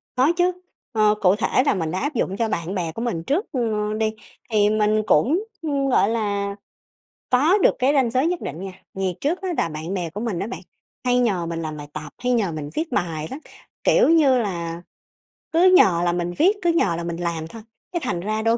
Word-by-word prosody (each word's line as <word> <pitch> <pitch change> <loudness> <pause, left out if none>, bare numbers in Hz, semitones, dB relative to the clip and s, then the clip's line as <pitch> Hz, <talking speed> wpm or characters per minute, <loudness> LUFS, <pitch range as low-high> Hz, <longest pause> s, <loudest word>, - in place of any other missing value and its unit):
Có 260 +5 +4
chứ, 355 0 +3 0.4
ờ, 215 -3 +3
cụ 185 0 +5
thể 225 +4 +1
là - - +3
mình 165 -5 -2
đã 185 - -2
áp 290 +2 -2
dụng 195 -4 -1
cho 230 - +1
bạn 170 0 -3
bè 170 -4 -2
của 225 - -6
mình 205 -9 -2
trước, 320 - 0
ơ, 215 -4 -1
đi, 220 0 0 0.4
thì 210 -2 +3
mình 215 0 +2
cũng, 280 - +3 0.2
ưm, 285 -4 -1
gọi 210 -5 +3
là, 200 -3 -1 0.7
có 295 +10 +4
được 405 - +3
cái 265 +3 +3
ranh 260 -5 +2
giới 260 +5 +2
nhất 350 0 -1
định 160 - -5
nha. 195 0 -5 0.2
Vì 190 -1 -1
trước 330 +7 0
á 380 - -3
là 165 - +1
bạn 155 +4 -5
bè 180 -4 -2
của 200 +6 -6
mình 225 -7 -2
á 200 - -2
bạn, 240 - -6 0.5
hay 250 0 +3
nhờ 200 -8 +1
mình 165 0 -4
làm 155 -1 -5
bài 145 0 -8
tập 150 -1 -7
hay 250 0 -1
nhờ 220 -7 +1
mình 150 -2 -5
viết 320 - -3
bài 160 -7 -2
lắm, 270 - -5 0.4
kiểu - - +4
như 300 -6 +5
là, 170 -6 -3 0.7
cứ 360 +3 +5
nhờ 170 - +5
là 175 - +2
mình 175 0 -2
viết, 375 +7 +4
cứ 345 - +3
nhờ 200 - +2
là 170 - -4
mình 170 0 -4
làm 170 -2 -3
thôi, 225 +5 -10 0.3
cái 350 - -1
thành 175 - -1
ra 215 +4 -2
đôi 225 +1 +2
215 Hz, 235 wpm, -22 LUFS, 175-260 Hz, 0.7 s, cụ